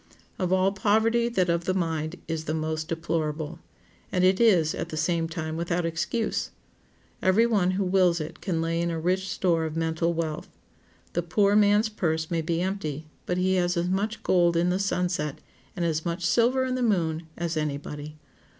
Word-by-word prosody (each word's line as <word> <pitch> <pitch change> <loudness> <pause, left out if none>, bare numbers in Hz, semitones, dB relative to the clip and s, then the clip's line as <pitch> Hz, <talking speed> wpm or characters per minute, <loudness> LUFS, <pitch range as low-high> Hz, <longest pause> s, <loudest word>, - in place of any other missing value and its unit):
Of 185 -2 0
all 190 +1 +3
poverty 220 +4 +2
that 185 -6 +1
of 170 0 0
the 185 - 0
mind 160 -2 -1
is 160 -1 -3
the 155 - -1
most 155 0 -2
deplorable. 165 -1 -2 0.5
And 180 - +1
it 185 +1 +4
is, 180 -10 +4
at 165 - -4
the 155 - -5
same 165 0 0
time, 160 -2 -4
without 170 +1 -1
excuse. 190 +7 -1 0.7
Every 190 +5 +4
one 205 -6 +2
who 200 - +1
wills 180 -2 +3
it 155 - -7
can 165 -5 -1
lay 165 +1 0
in 170 - 0
a 165 -1 -2
rich 185 +3 0
store 170 -3 +1
of 160 -1 -4
mental 165 +1 0
wealth. 160 -2 -3 0.6
The 175 - +1
poor 200 +4 +2
man's 210 +1 +4
purse 160 -6 -1
may 165 -1 +1
be 165 +2 -1
empty, 160 -6 -3 0.2
but 180 - 0
he 185 +1 +2
has 175 0 +1
as 175 +1 0
much 205 +3 -1
gold 175 -2 +3
in 175 +1 +2
the 185 - 0
sunset, 180 -6 -1 0.4
and 175 -2 -1
as 160 -1 0
much 175 0 -2
silver 250 +5 +3
in 255 - -1
the 255 - -1
moon, 165 -8 0
as 170 -1 -2
any 150 -2 -1
body. 150 +1 -8
170 Hz, 195 wpm, -26 LUFS, 160-190 Hz, 0.7 s, it